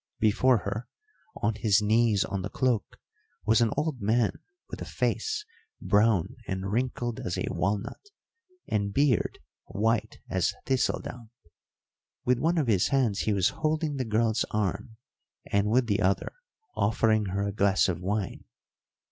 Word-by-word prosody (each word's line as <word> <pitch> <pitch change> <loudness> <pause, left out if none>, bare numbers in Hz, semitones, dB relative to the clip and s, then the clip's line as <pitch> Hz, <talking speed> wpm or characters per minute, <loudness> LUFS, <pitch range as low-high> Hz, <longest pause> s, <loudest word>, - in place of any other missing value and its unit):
Before 120 +4 +4
her, 105 +4 -3 0.6
on 105 - +2
his 105 -1 +3
knees 110 -1 +3
on 100 - -3
the 95 - -4
cloak, 125 -3 -1 0.5
was 110 +2 +4
an 115 - +4
old 150 -5 -1
man 110 +2 +1 0.3
with - - -8
a - - -4
face 435 -1 -1 0.3
brown 105 +2 +2
and 95 0 -3
wrinkled 120 0 -1
as 90 - -3
a - - -1
walnut, 100 - -2 0.6
and 100 -1 0
beard 135 +1 +2 0.3
white 110 +2 0
as - - 0
thistle 130 0 +1
down. 120 -2 -9 1.0
With 125 -1 +2
one 165 +5 +1
of 155 - +2
his 100 -6 +3
hands 125 -7 +1
he 110 - 0
was 95 -3 +3
holding 155 -1 -1
the 130 - 0
girl's 110 0 +1
arm, 105 +1 -2 0.6
and 100 +1 +2
with 125 +3 +3
the 105 -1 0
other 95 0 +1 0.4
offering 110 0 +2
her 100 +2 -1
a 100 - -1
glass 100 -2 +3
of 90 -3 -2
wine. 100 +1 -3
110 Hz, 150 wpm, -28 LUFS, 100-125 Hz, 1.0 s, Before